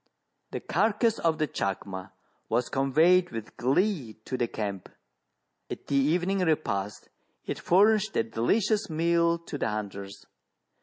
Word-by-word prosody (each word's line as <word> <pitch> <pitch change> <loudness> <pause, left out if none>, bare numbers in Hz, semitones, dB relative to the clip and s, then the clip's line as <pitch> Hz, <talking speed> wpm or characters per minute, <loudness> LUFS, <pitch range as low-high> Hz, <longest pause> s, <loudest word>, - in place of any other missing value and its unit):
The - - -4
carcase 215 +5 +1
of 165 -2 +1
the 155 -1 0
chacma 95 -3 -4 0.4
was 120 +2 0
conveyed 160 +7 +3
with 115 -2 -7
glee 140 - 0
to 130 - -3
the 120 -2 0
camp. 100 -4 -5 0.8
At - - -7
the 140 - -2
evening 175 +8 +2
repast 105 - -1 0.4
it - - -4
furnished 210 +3 +3
a - - +3
delicious 200 - 0
meal 170 +1 +2
to 165 -3 -7
the - - 0
hunters. 100 -2 -6
155 Hz, 135 wpm, -28 LUFS, 110-180 Hz, 0.8 s, conveyed